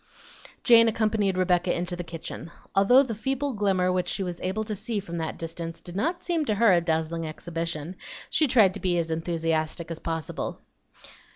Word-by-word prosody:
Jane 230 -2 +7
accompanied 215 -4 +1
Rebecca 180 -1 +2
into 175 +1 -2
the 175 - -5
kitchen. 165 0 -7 0.2
Although 245 +8 +6
the 245 -4 -4
feeble 265 +5 -1
glimmer 190 -4 +1
which 180 -1 0
she 195 - -1
was 175 -2 -5
able 190 +4 -1
to 215 -1 -4
see 220 +1 -2
from 170 -3 -5
that 160 -1 -3
distance 165 0 -5
did 175 - -10
not 335 - -1
seem 340 -3 0
to 215 - 0
her 215 -2 +5
a 175 - +4
dazzling 165 0 -1
exhibition, 165 +1 -4 0.3
she 310 - +2
tried 220 -7 +5
to 200 - -6
be 180 -2 +1
as 165 -1 -1
enthusiastic 165 0 -1
as 165 - -4
possible. 165 -2 -4
180 Hz, 185 wpm, -26 LUFS, 165-215 Hz, 0.3 s, Jane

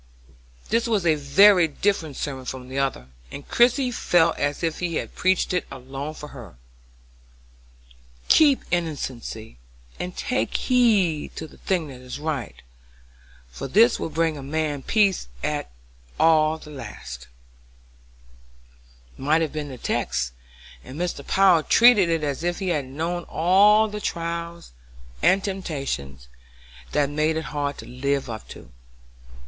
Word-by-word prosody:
This 230 +1 +1
was 210 -6 0
a 160 - +5
very 170 +5 +5
different 160 -2 -1
sermon 135 -3 -4
from 130 0 -7
the 135 +1 -3
other, 135 - -2 0.2
and 140 - -9
Christie 250 +2 +3
felt 170 -7 +2
as 145 +3 -1
if 165 -1 -1
he 170 -2 -1
preached 185 0 0
it 180 - +1
for 135 - -8 0.5
her 135 -3 -10
alone. 90 - -15 1.7
"Keep 290 -4 +5
innocency 130 - -4 0.4
and 180 0 -5
take - - -1
heed 210 - +2
to 160 - -5
the - - -16
thing 175 -6 -1
that 130 -2 -11
is 125 +1 -7
right, 145 -6 -4 0.9
for 65 - -6
this 225 - +4
will - - -3
bring 160 0 0
a - - -7
man 145 0 -2
peace 200 - +2 0.2
at - - -2 0.5
the - - +3 0.4
last," 65 - -9 1.9
might 150 +4 +2
have 155 - -3
been 150 -2 -4
the 130 - -8
text, - - -2 0.5
and 135 +5 -9
Mr. 180 0 -3
Power 190 -4 +5
treated 220 0 +5
it 165 -2 0
as 145 +1 -2
if 175 0 -1
he 190 -2 -3
had 150 -6 0
known 165 +6 -3
all 205 +6 +4
the 210 0 -6
trials 170 - -4 0.5
and 195 0 +4
temptations 135 - -4 0.6
that 145 - +2
made 155 +2 0
it 160 - -2
hard 145 -1 -2
to - - -9
live 135 0 -2
up 110 - -8
to. 60 - -12
160 Hz, 140 wpm, -24 LUFS, 135-185 Hz, 1.9 s, a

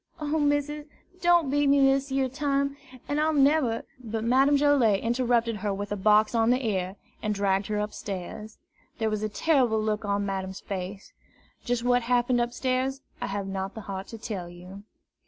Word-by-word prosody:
O 305 +1 -1
missus, 290 +1 0 0.3
don't 345 -5 +4
beat 290 0 +2
me 280 0 +5
dis 270 0 +3
yere 265 0 +1
time, 280 +1 -1 0.3
an' 290 +1 -1
I'll 310 +1 +2
neber 275 -4 +3
" - - -36
But 220 -1 -3
Madame 270 +5 +4
Joilet 275 -8 +4
interrupted 235 -1 +1
her 205 0 -2
with 205 +1 -5
a - - 0
box 210 +2 +4
on 225 -1 +3
the 250 +1 +2
ear, 190 -3 -1 0.3
and 210 -1 -1
dragged 195 0 +1
her 210 - -1
upstairs. 210 0 -5 0.4
There 220 -1 0
was 215 -1 -2
a 215 - -1
terrible 245 -2 +2
look 215 0 -1
on 200 0 0
Madame's 190 -1 -4
face. 195 0 -6 0.5
Just 245 -1 -1
what 245 0 +3
happened 245 +1 +2
upstairs, 255 +2 -1 0.2
I - - -2
have 200 0 -3
not 195 0 -4
the 220 - -6
heart 195 -1 -6
to 225 - -8
tell 205 -6 -5
you. 180 +3 -11
230 Hz, 185 wpm, -27 LUFS, 205-270 Hz, 0.5 s, me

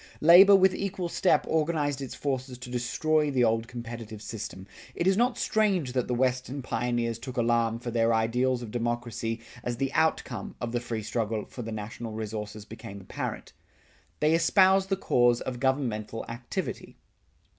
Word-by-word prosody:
Labor 185 +5 +9
with 190 -1 +5
equal 190 -3 -3
step 185 - +2
organized 150 -3 0
its 135 - -6
forces 130 -2 -3
to 125 0 -9
destroy 150 +5 +1
the 130 -3 +2
old 115 0 +1
competitive 115 -3 -7
system. 105 -3 -7 0.3
It 170 - -1
is 190 0 +4
not 245 +4 +2
strange 195 -12 +1
that 125 -2 0
the 125 - 0
Western 130 +2 -1
pioneers 120 -1 -1
took 125 +1 -8
alarm 115 -1 +2
for 120 0 -5
their 115 0 +2
ideals 120 +3 +1
of 110 - -7
democracy 120 -1 -2 0.2
as 120 -1 -3
the 135 +1 -1
outcome 155 -9 0
of 120 -1 -3
the 120 - 0
free 115 -2 -4
struggle 110 0 -2
for 125 - -8
the 115 -1 -5
national 110 +1 -6
resources 105 -1 -5
became 110 -2 -9
apparent. 95 - -6 0.7
They 150 +1 +4
espoused 190 +3 +4
the 195 - +1
cause 120 -8 +3
of 125 -2 -5
governmental 120 -5 -1
activity. 120 +1 -5
120 Hz, 165 wpm, -28 LUFS, 115-145 Hz, 0.7 s, Labor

